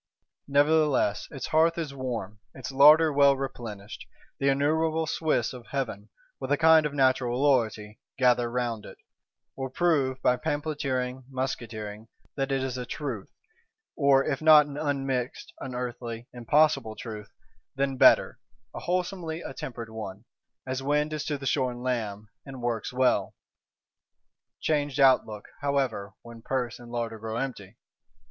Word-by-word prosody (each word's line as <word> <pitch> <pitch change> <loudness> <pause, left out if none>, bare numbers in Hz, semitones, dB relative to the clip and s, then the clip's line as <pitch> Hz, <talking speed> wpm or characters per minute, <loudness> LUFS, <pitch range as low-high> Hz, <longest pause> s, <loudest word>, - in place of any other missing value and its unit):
Nevertheless 145 -6 +2
its 140 - -6
hearth 165 +2 +3
is 155 -4 -3
warm, 115 -6 -5 0.2
its 130 0 -6
larder 150 +3 +7
well 140 -1 +5
replenished: 110 -6 -7 0.3
the 140 - +2
innumerable 160 +3 +1
Swiss 155 -7 0
of 125 -2 -11
Heaven, 115 -6 -4 0.3
with 135 0 -5
a 145 - +4
kind 160 -1 +6
of 145 - -9
Natural 130 -2 +2
loyalty, 115 -6 +1 0.2
gather 125 -2 +3
round 120 -3 -2
it; - - -11 0.6
will 135 -1 -4
prove, 135 -4 +1
by 125 - +3
pamphleteering, 130 -4 -2
musketeering, 115 -5 -5 0.3
that 135 -1 -2
it 135 -1 0
is 130 -1 -3
a 125 - -4
truth; 125 -10 -5 0.7
or 140 -2 +4
if 140 -2 -2
not 155 -1 +8
an 145 -1 -9
unmixed 135 -4 -2
(unearthly, 125 -2 -5
impossible) 130 -1 +2
Truth, 105 -2 -8 0.5
then 135 0 0
better, - - +5 0.3
a - - -6
wholesomely 180 -2 -2
attempered 120 -3 -7
one, 105 -1 -7 0.4
(as 130 0 -3
wind 150 +2 0
is 155 - -3
to 145 - -2
the 135 - -9
shorn 125 -2 -1
lamb), 110 -5 -3 0.2
and 135 -3 -9
works 115 -3 -2
well. 130 0 +1 1.2
Changed 145 -2 -1
outlook, 130 -6 +3
however, 130 -9 -1
when 115 -1 -11
purse 125 -1 -3
and 120 -1 -12
larder 115 -2 -3
grow 110 +1 -4
empty! 115 -5 -5
130 Hz, 140 wpm, -27 LUFS, 120-145 Hz, 1.2 s, not